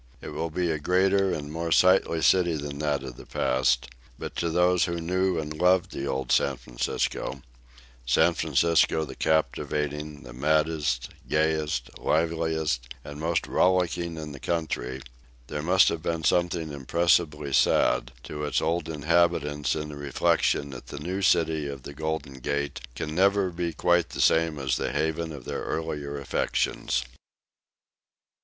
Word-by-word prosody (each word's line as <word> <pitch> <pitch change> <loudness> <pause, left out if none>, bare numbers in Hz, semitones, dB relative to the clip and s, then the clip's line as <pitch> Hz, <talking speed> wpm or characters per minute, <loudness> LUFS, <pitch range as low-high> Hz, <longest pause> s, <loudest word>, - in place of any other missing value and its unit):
It - - -8
will 85 - -3
be 85 +1 -1
a 80 - -2
greater 95 +4 +2
and 75 -1 -4
more 85 +1 -3
sightly 90 -2 +4
city 90 -3 +4
than 70 -1 -5
that 75 -3 0
of 65 -2 -8
the - - -11
past, 65 -1 +1 0.3
but - - -7
to 85 - 0
those 90 +2 +3
who 85 -1 -3
knew 90 +2 0
and 75 -1 -3
loved 90 +2 +3
the 70 - -4
old 65 -1 -2
San 70 -2 +2
Francisco - - -3 0.6
San 80 +8 +3
Francisco 80 +1 +2
the 70 - -8
captivating, 75 -1 -1
the - - -10
maddest, 75 -2 0 0.2
gayest, 75 -5 0
liveliest 80 -6 0
and 75 0 -9
most 80 +2 0
rollicking 90 -2 +1
in 75 -1 -6
the 70 - -9
country 70 -6 -3 0.4
there 75 +4 -4
must 95 +4 +5
be 85 -1 -2
something 85 -2 +1
impressibly 75 0 +1
sad - - +3
to 75 +2 -6
its 75 - +1
old 80 0 -1
inhabitants 75 -3 +1
in 75 -1 -4
the 75 - -7
reflection 70 0 +1
that 65 -2 -10
the - - -7
new 90 +7 -3
city 80 -5 +2
of 70 -2 -7
the 70 - -8
Golden 80 -3 -4
Gate 70 +2 -2 0.2
can 75 - -4
never 95 +1 +3
be 85 0 -2
quite 85 0 +2
the - - -8
same 80 -1 +3
as 65 -2 0
the - - -2
haven 80 +3 -1
of 70 -5 -9
their - - -4
early 80 -2 -3 0.2
affections. 70 - -1
80 Hz, 155 wpm, -26 LUFS, 70-85 Hz, 0.6 s, must